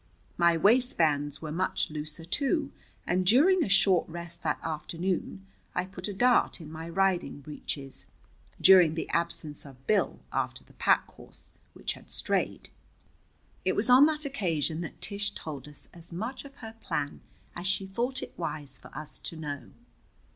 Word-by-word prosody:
My 170 -1 +4
waistbands 165 - +3
were 155 - -4
much 180 -1 0
looser, 155 +1 -5
too, 280 - +1 0.3
and 185 +1 +1
during 315 - +5
a - - -2
short 190 -3 +4
rest 170 +1 -7
that - - 0
afternoon 170 +4 -3 0.3
I 180 - +1
put 185 0 -6
a 205 - -3
dart 245 0 +4
in 155 -2 -9
my 160 +1 -6
riding 185 -3 +1
breeches, 140 -1 -5 0.5
during 180 -5 +7
the 165 - -3
absence 170 -3 -2
of 135 -2 -14
Bill 210 - +2
after - - -1
the - - -21
pack - - +3
horse, - - -14 0.2
which - - -3
had - - -15
strayed. - - -1 0.9
It - - +1
was 250 - +2
on 265 +4 +9
that 310 -1 -1
occasion 170 - -1
that 165 - -7
Tish 205 0 -1
told 145 -3 -7
us 150 - -9
as 170 0 -12
much 225 +11 -4
of 275 - -12
her 225 0 -9
plan 145 -1 -2 0.3
as 175 +2 -4
she 195 0 +1
thought 240 +7 -1
it - - -8
wise 150 -6 -4
for - - -12
us 150 -1 -7
to - - -6
know. 145 -3 -5
175 Hz, 165 wpm, -29 LUFS, 155-205 Hz, 0.9 s, on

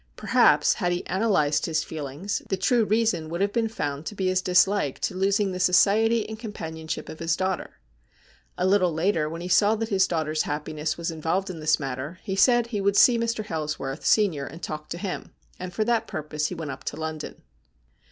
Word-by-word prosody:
Perhaps, - - +4
had 175 - -1
he 175 - -2
analysed 185 -7 +1
his 155 -1 0
feelings, 155 +6 -4
the 190 - 0
true 225 +4 +2
reason 215 -7 +1
would 170 +1 -4
have 200 +1 0
been 230 -2 +1
found 145 -9 -3
to 210 - -5
be 190 -2 0
his 185 0 +1
dislike 180 -4 +2
to - - -1
losing 195 +1 +1
the 185 - -4
society 215 +5 +3
and 220 0 -7
companionship 160 -8 -6
of 160 - -9
his 165 0 0
daughter. 190 -1 -3 0.8
A 180 - 0
little 185 -2 +3
later, 160 -1 0
when 165 +2 -6
he 175 - -5
saw 205 +4 +4
that 225 0 -3
his 195 -2 +3
daughter's 155 -2 -1
happiness 150 +1 -3
was 170 0 -3
involved 165 +4 -1
in 165 - -8
this 155 -1 +2
matter, 135 +4 -5
he 190 -3 -3
said 240 +4 +4
he 220 -4 -3
would 200 0 +2
see 240 -2 +6
Mr. 230 -2 -1
Hailsworth, 150 -5 -4
sen., 210 -5 +4
and 150 +3 -7
talk 150 0 -5
to 170 - -4
him; 185 +1 -5 0.2
and 185 0 -5
for 215 +5 0
that 230 0 0
purpose 150 0 -3
he 180 - -6
went 160 -4 -5
up 130 - -9
to - - -4
London. 160 -1 -6
180 Hz, 205 wpm, -25 LUFS, 155-205 Hz, 0.8 s, see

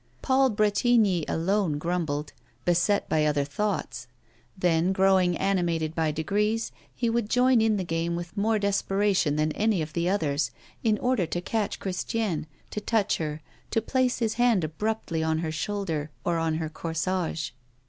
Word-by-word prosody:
Paul 265 0 +4
Bretigny 210 -4 +3
alone 175 -2 0
grumbled, 155 -3 -2 0.3
beset 175 +3 +2
by 155 -1 +2
other 150 -2 +2
thoughts; 205 +9 -3 0.5
then, 175 0 +2
growing 190 -2 +3
animated 170 -5 0
by 160 -1 +1
degrees 210 +9 0 0.2
he 240 - 0
would 230 -2 0
join 250 -1 +4
in 220 -1 +3
the 190 - -1
game 165 0 -1
with 175 +1 -6
more 220 +2 +2
desperation 195 -5 +1
than 155 +1 +1
any 210 +2 +1
of 155 -1 -4
the 170 +1 0
others, 155 -7 0 0.3
in 220 -2 +3
order 245 -8 +1
to 175 - -2
catch 210 +3 -2
Christiane, 190 -3 -2 0.2
to 210 - -3
touch 220 -2 +1
her, 155 -1 -4 0.3
to - - +1
place 255 +2 +1
his 225 -2 0
hand 235 -7 +4
abruptly 165 +1 -2
on 160 0 +1
her 160 -1 -2
shoulder 160 -3 -2 0.2
or 170 -2 +1
on 165 -1 0
her 160 0 -2
corsage. 165 0 -2
185 Hz, 160 wpm, -27 LUFS, 160-210 Hz, 0.5 s, Paul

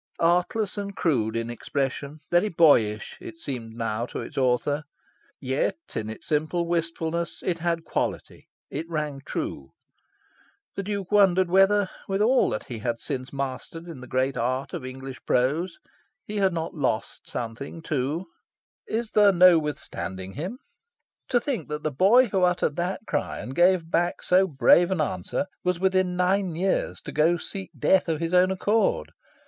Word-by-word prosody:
Artless 180 +5 +1
and 200 -1 -5
crude 115 -9 +1
in 115 +1 -2
expression, 140 +4 -3
very 175 +5 +3
boyish, 115 - +3
it 165 - -9
seemed 120 -8 -6
now 115 0 -2
to - - -6
its - - -7
author. 135 +3 +1 0.6
Yet, 130 - -1 0.2
in 110 0 -3
its 110 - -8
simple 155 +3 0
wistfulness, 170 0 -2
it 170 -2 0
had 170 -1 -1
quality: - - -3 0.2
it 160 +4 -4
rang 150 -4 -3
true. 65 - -5 1.0
The - - -3
Duke 200 -1 -4
wondered 190 -3 +4
whether, 195 +1 +5 0.2
with 195 0 -1
all 245 +5 +4
that 105 - -3
he 120 -5 -6
had 115 +1 -2
since 130 0 -4
mastered 140 +5 -5
in 160 -7 -8
the 130 - -9
great 130 +2 0
art 130 +3 -1
of 170 -6 -4
English 130 0 -7
prose, 150 +8 +1 0.5
he 210 - -5
had 195 -2 +3
not 165 -1 -3
lost 115 -8 -2
something, 125 +7 -6
too. 150 +4 -1 0.6
"Is 225 0 -2
there 205 -1 +6
no 180 -2 +7
withstanding 95 -11 -5
him?" 180 - -5 0.7
To 245 - +4
think 235 - -3
that 150 0 -4
the 155 - 0
boy 205 - +5
who 190 -1 +1
uttered 180 -4 +2
that 180 +2 -2
cry, 145 -7 -2
and 130 - -6
gave 175 0 +3
back 175 +1 0
so 185 +1 +4
brave 170 +3 +5
an 190 -3 -1
answer, 145 - -1 0.2
was 180 -1 0
within 185 -1 +2
nine 180 -1 +1
years 190 +3 0
to - - -7
go 160 +3 +3
seek 190 +3 -6
death 190 -2 +3
of 160 -2 0
his 165 +1 -2
own 180 +1 +5
accord! 205 +4 +1
165 Hz, 165 wpm, -26 LUFS, 135-185 Hz, 1.0 s, no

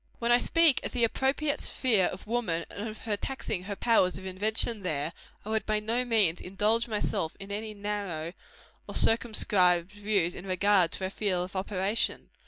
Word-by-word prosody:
When 235 0 0
I 240 - +6
speak 330 0 +3
of - - -5
the 245 -2 +1
appropriate 280 +5 0
sphere 220 -8 +2
of 185 - -8
woman, 210 -8 -2
and 215 +2 -5
of 215 - -9
her 215 -2 0
taxing 205 -5 -5
her 200 0 -4
powers 195 -5 +2
of 190 - -9
invention 210 +3 +1
there, 155 -3 -2 0.3
I - - -7
would 220 0 0
by 215 -1 +1
no 230 +4 -1
means 210 -8 +1
indulge 215 +5 0
myself 205 -7 -2
in 195 0 -9
any 215 +1 -5
narrow 200 -6 -4 0.5
or - - -6
circumscribed 190 -6 +4
views 205 -4 0
in 190 - -9
regard 185 -2 +3
to - - -3
her 190 - -2
field 190 -4 -1
of 185 - -13
operation. 195 +2 -1
205 Hz, 185 wpm, -28 LUFS, 185-225 Hz, 0.5 s, I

